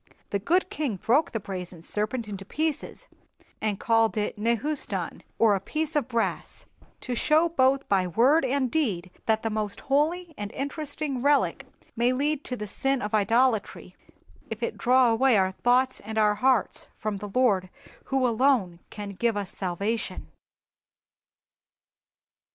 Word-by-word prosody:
"The 200 - 0
good 360 - +1
king 295 - -2
broke 245 - +2
the 225 - -3
brazen 180 -4 -7
serpent 215 +5 -1
into 195 -2 -6
pieces, 310 +8 -3 0.5
and 210 -3 -1
called 225 -1 +2
it 210 - -1
Nehustan, 235 +7 -2 0.2
or 220 -2 +5
a 195 - +1
piece 310 - -3
of 295 - +1
brass, 235 -3 -2 0.4
to 250 - -4
show 310 +7 +3
both 270 -3 +2
by 190 -2 +2
word 260 - +4
and 260 -1 0
deed 195 - -1 0.2
that 220 -1 +2
the 225 - -1
most 210 -1 -3
holy 320 +5 0
and 205 0 -4
interesting 285 -1 -3
relic 285 +1 +2 0.3
may 240 +2 +2
lead 290 +2 0
to 250 - -3
the 210 - -5
sin 270 +6 0
of 210 -1 -4
idolatry, 225 +2 +1 0.5
if 225 +1 -5
it - - -2
draw 250 -1 +4
away 240 0 +4
our 190 -1 +2
thoughts 250 +6 +2
and 220 0 -7
our 210 -1 +4
hearts 255 +5 +1
from 215 -2 -3
the 205 +1 -7
Lord 200 -5 +2 0.4
who 265 -1 +1
alone 235 -7 +2
can 205 -1 -7
give 225 +3 0
us 200 -2 -4
salvation." 200 +5 -3
235 Hz, 150 wpm, -26 LUFS, 210-275 Hz, 0.5 s, or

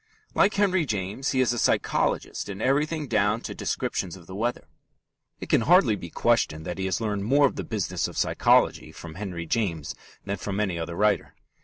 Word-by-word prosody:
Like 200 - +3
Henry 190 -3 +2
James, 105 +1 -2
he 130 - +2
is 125 -1 +2
a 120 - -2
psychologist - - 0
in 100 -1 -6
everything 150 +5 0
down 105 0 +1
to - - -6
descriptions 90 -1 -3
of 90 -3 -14
the 95 - -10
weather. 115 +5 -2 0.7
It - - -7
can - - +3
hardly 150 - +5
be 85 -3 -8
questioned 80 -8 +1
that 90 +3 -5
he 95 - -1
has 95 -2 0
learned 105 -3 -1
more 140 +5 +4
of 135 - 0
the - - -4
business 95 -5 -2
of - - -9
psychology - - +2
from 80 -2 -10
Henry 90 -2 -5
James 85 -6 -1 0.3
than 100 0 -2
from 100 0 -4
any 95 -5 -1
other 85 +1 -4
writer. 105 +1 +1
105 Hz, 195 wpm, -26 LUFS, 95-130 Hz, 0.7 s, hardly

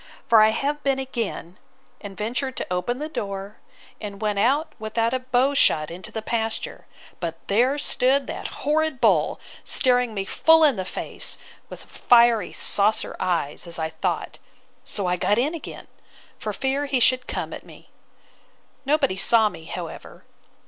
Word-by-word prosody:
—For 225 -2 +6
I 215 - +6
have 285 +6 -1
been 275 -2 +1
again, 230 -9 -4 0.4
and 195 -2 -8
ventured 250 +5 -2
to - - -3
open 210 +7 -1
the 300 +3 -4
door, 200 -7 -5 0.4
and 200 -2 -6
went 210 -2 -1
out 290 +8 +2
about 225 +2 0
a 260 - +1
bow 255 +2 +1
shot 155 - +3
into 180 +2 -8
the 220 - -5
pasture; 225 -1 -3 0.3
but 165 -1 -4
there 245 +8 +2
stood 275 -1 +2
that - - -5 0.2
horrid 310 -2 +1
bull, - - +3 0.2
staring 250 -4 +2
me 195 -1 -2
full 320 +10 +5
in 290 -5 +5
the 190 -2 -4
face, - - -4 0.3
with - - -10
fiery 235 -4 +4
saucer 210 +2 0
eyes, 175 -3 -1
as 170 - -2
I 160 -1 -2
thought. 160 - -3 0.4
So 200 - -4
I 180 0 +1
got 205 +4 +1
in 275 +7 +1
again, 330 - -8 0.5
for 215 - -3
fear 270 +6 -1
he 270 -2 +1
should 255 +1 +3
come - - -4
at - - -8
me. - - -16 1.0
Nobody 280 -8 +2
saw 220 +2 +3
me, 165 -4 -12
however. - - -8
230 Hz, 165 wpm, -24 LUFS, 200-270 Hz, 1.0 s, For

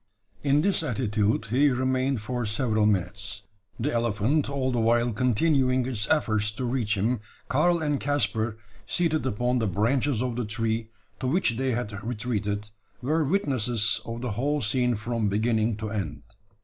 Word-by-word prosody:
In 145 +1 +3
this 200 -2 +2
attitude 110 -6 0
he 140 +4 +4
remained 130 -1 0
for 125 +2 -2
several 110 -1 +1
minutes 100 +1 -2 0.4
the 140 +6 -1
elephant 120 +6 +1
all 135 -2 -1
the 120 - 0
while 120 +1 +2
continuing 130 +2 +2
its 115 -4 -2
efforts 110 -8 +2
to 125 +4 -3
reach 120 -4 0
him 115 +5 +1 0.3
Karl 170 +4 +2
and 145 -2 0
Caspar, 120 -6 0 0.3
seated 160 -5 +1
upon 125 +2 0
the 110 - 0
branches 115 +6 +1
of 125 -2 -2
the 125 - -1
tree, 110 +1 -1 0.3
to 130 - -2
which 160 0 +2
they 130 +2 -1
had 105 -3 -4
retreated, 105 -3 -2 0.3
were 155 +5 +2
witnesses 125 - +1
of 115 0 -6
the 125 -3 -2
whole 140 +8 0
scene 125 +1 +1
from 110 0 -1
beginning 110 +1 +1
to 110 -1 -4
end. 80 -9 -4
120 Hz, 160 wpm, -26 LUFS, 110-130 Hz, 0.4 s, he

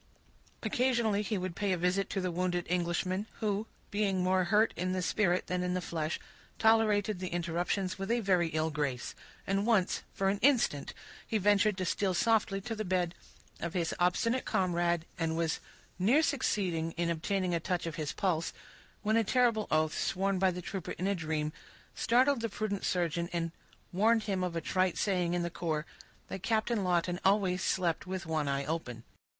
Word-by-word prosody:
Occasionally 235 -5 +2
he 210 0 -1
would 185 -2 -4
pay 200 -1 0
a - - 0
visit 180 +3 +1
to 195 - -2
the 185 -1 -1
wounded 175 0 -1
Englishman, 180 +3 -1
who, 210 0 -2 0.2
being 200 -3 +1
more 185 0 +2
hurt 215 +5 +3
in 185 +2 -1
the 185 - -1
spirit 180 -1 +1
than 180 0 -1
in 180 0 -1
the - - +1
flesh, 160 -3 -3 0.4
tolerated 215 -3 +3
the 185 - -3
interruptions 175 +2 -1
with 195 - -4
a 235 +1 +2
very 185 -5 +2
ill 160 0 -1
grace; 140 -4 -2 0.3
and 195 +2 0
once, 205 -6 +2
for 195 0 0
an 200 +1 0
instant, 235 - +2 0.3
he 220 - +1
ventured 205 0 +3
to 185 - -1
steal 190 +1 0
softly 210 +1 +2
to 225 +4 -4
the 215 - -3
bed 180 -3 0 0.5
of 170 +2 -4
his 170 -2 0
obstinate 230 +8 +2
comrade, 175 -4 +1
and 165 -1 0
was 165 -1 0 0.4
near 245 - +4
succeeding 180 - 0
in 170 0 0
obtaining 180 +2 -1
a 170 - +1
touch 175 +1 -2
of 165 - -3
his 150 -2 -2
pulse, 170 -4 -1 0.5
when 215 +1 +2
a 230 - +4
terrible 230 -1 +2
oath, 155 0 +2
sworn 195 0 0
by 190 0 +4
the 180 0 -5
trooper 190 -1 -4
in 185 - -4
a 200 - +2
dream, 155 -3 -2 0.4
startled 255 +2 +3
the 230 - -1
prudent 205 -1 -3
surgeon, 170 -1 0
and 165 -1 -1 0.4
warned 220 +4 +3
him 195 -3 -1
of 180 -2 -2
a 165 - -1
trite 185 +2 +1
saying 180 -4 +1
in 175 - 0
the 170 - -3
corps, 160 -3 -2 0.4
"that 190 - -6
Captain 220 0 +1
Lawton 175 0 +1
always 190 -2 +3
slept 175 -1 0
with 190 0 -4
one 155 -2 -1
eye 140 0 0
open." 130 -8 -4
185 Hz, 185 wpm, -31 LUFS, 170-205 Hz, 0.5 s, near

